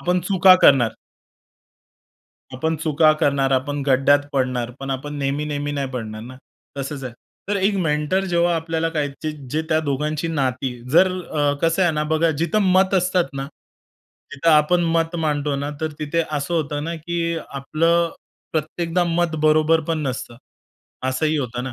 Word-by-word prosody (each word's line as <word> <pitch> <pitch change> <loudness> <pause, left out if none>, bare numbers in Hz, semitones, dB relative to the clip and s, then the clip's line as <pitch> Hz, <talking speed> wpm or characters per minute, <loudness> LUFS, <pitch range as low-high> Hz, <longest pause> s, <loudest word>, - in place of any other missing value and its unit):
आपण 180 +1 +1
चुका 185 +1 +6
करणार. 120 -5 +5 1.6
आपण 160 +5 -1
चुका 155 0 +3
करणार, 140 -3 +2
आपण 140 +2 -1
खड्ड्यात 135 +1 +4
पडणार. 125 -3 -1
पण 135 0 -5
आपण 140 +3 -4
नेहमी-नेहमी 145 +1 -2
नाही 140 -2 -2
पडणार 110 -4 -6
ना? 125 +2 -10 0.4
तसंच 140 0 -5
आहे. 125 - -5 0.4
तर 205 - +1
एक 200 +1 +1
मेंटर 160 +2 0
जेव्हा 175 -1 +1
आपल्याला 165 0 -1
काय 150 -3 -1 0.4
जे 155 +3 0
त्या 155 -1 +2
दोघांची 150 +3 -1
नाती 130 -4 -1 0.2
जर 175 +6 +6
अ, 145 -3 0
कसं 165 +3 +2
आहे 175 - +4
ना, 150 0 -1
बघा 165 +1 +3
जिथं 170 +6 +1
मत 190 +1 +3
असतात 180 -1 +2
ना, 135 0 -4 0.9
तिथं 145 +4 +1
आपण 155 +3 +4
मत 165 +1 0
मांडतो 150 -3 -1
ना, 140 +1 -3
तर 160 -1 -2
तिथे 155 +2 0
असं 150 +3 -2
होतं 150 -2 -2
ना 165 +1 -3
की 170 +1 -2
आपलं 165 +5 +1 0.4
प्रत्येकदा 165 +3 -1
मत 170 -1 0
बरोबर 155 +1 +4
पण 165 -1 0
नसतं 125 -2 -5 0.7
असंही 155 +4 0
होतं 125 -3 -3
ना. 130 - -5
155 Hz, 155 wpm, -21 LUFS, 140-165 Hz, 1.6 s, चुका